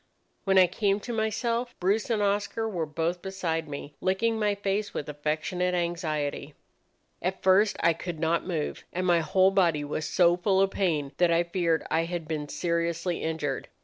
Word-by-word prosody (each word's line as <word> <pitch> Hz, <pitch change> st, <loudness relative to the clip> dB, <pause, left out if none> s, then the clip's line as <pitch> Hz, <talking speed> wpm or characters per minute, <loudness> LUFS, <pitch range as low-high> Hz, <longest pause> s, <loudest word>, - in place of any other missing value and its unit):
"When 195 Hz, -1 st, +3 dB
I 185 Hz, -, +8 dB
came 195 Hz, +3 st, 0 dB
to 240 Hz, -, -5 dB
myself, 230 Hz, +2 st, -1 dB
Bruce 200 Hz, +6 st, +1 dB
and 215 Hz, -3 st, +1 dB
Oscar 205 Hz, +2 st, 0 dB
were 175 Hz, -7 st, -2 dB
both 165 Hz, +3 st, -2 dB
beside 170 Hz, -5 st, -3 dB
me, 145 Hz, 0 st, -7 dB
licking 220 Hz, +4 st, +1 dB
my 210 Hz, -1 st, +1 dB
face 200 Hz, +1 st, -2 dB
with -, -, -3 dB
affectionate 155 Hz, +5 st, -1 dB
anxiety. 155 Hz, -4 st, -2 dB, 0.7 s
At 185 Hz, +2 st, -3 dB
first 200 Hz, +3 st, +4 dB
I 170 Hz, 0 st, +4 dB
could 170 Hz, 0 st, -6 dB
not 165 Hz, +1 st, +1 dB
move, 160 Hz, -5 st, -3 dB
and 185 Hz, +1 st, -2 dB
my 175 Hz, -2 st, +4 dB
whole 185 Hz, +4 st, +3 dB
body 170 Hz, -6 st, +2 dB
was 150 Hz, +1 st, -3 dB
so 175 Hz, -1 st, +4 dB
full 190 Hz, +1 st, +2 dB
of 195 Hz, 0 st, +3 dB
pain 155 Hz, -9 st, 0 dB
that 175 Hz, -1 st, +4 dB
I 170 Hz, +1 st, +3 dB
feared 170 Hz, -2 st, 0 dB
I 165 Hz, +1 st, +2 dB
had 170 Hz, -2 st, -4 dB
been 150 Hz, -2 st, -3 dB
seriously 170 Hz, 0 st, -1 dB
injured. 160 Hz, -4 st, -2 dB
175 Hz, 180 wpm, -27 LUFS, 160-195 Hz, 0.7 s, I